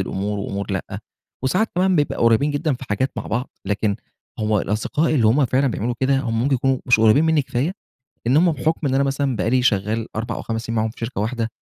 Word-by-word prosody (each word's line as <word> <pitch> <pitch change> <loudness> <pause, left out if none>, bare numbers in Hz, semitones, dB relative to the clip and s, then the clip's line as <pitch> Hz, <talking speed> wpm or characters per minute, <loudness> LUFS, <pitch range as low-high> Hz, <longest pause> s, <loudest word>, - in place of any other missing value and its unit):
الأمور 100 +2 -2
وأمور 100 +1 -4
لأ، 95 - -4 0.4
وساعات 185 +11 +1
كمان 185 0 +2
بيبقى 145 -2 +1
قريبين 115 +6 +3
جدًا 145 0 0
في 130 - -8
حاجات 130 +6 0
مع - - -4
بعض، 120 +4 -2 0.2
لكن 105 0 0 0.4
هو 105 -1 +1
الأصدقاء 145 +10 0
اللي 115 -6 +3
هم 135 +6 +4
فعلًا 135 +3 +1
بيعملوا 120 0 -1
كده، 135 +1 +2
هم 115 -3 -1
ممكن 135 +1 +2
يكونوا 130 +1 +1
مش 125 -3 +4
قريبين 110 +8 +5
مِنّي 160 -3 +3
كفاية، 135 +7 -1 0.5
إن 130 +4 +3
هم 170 +1 +4
بحكم 155 +2 -1
إن 130 - 0
أنا 140 +1 +3
مثلًا 135 -2 -1
بقى 105 +3 0
لي 125 0 +3
شغّال 110 0 +1
4 115 +1 -3
أو - - -5
5 115 0 -4
سنين 115 0 -3
معاهم 110 0 +1
في - - -17
شركة 115 -3 -3
واحدة، 115 +1 -1
125 Hz, 225 wpm, -21 LUFS, 110-140 Hz, 0.5 s, قريبين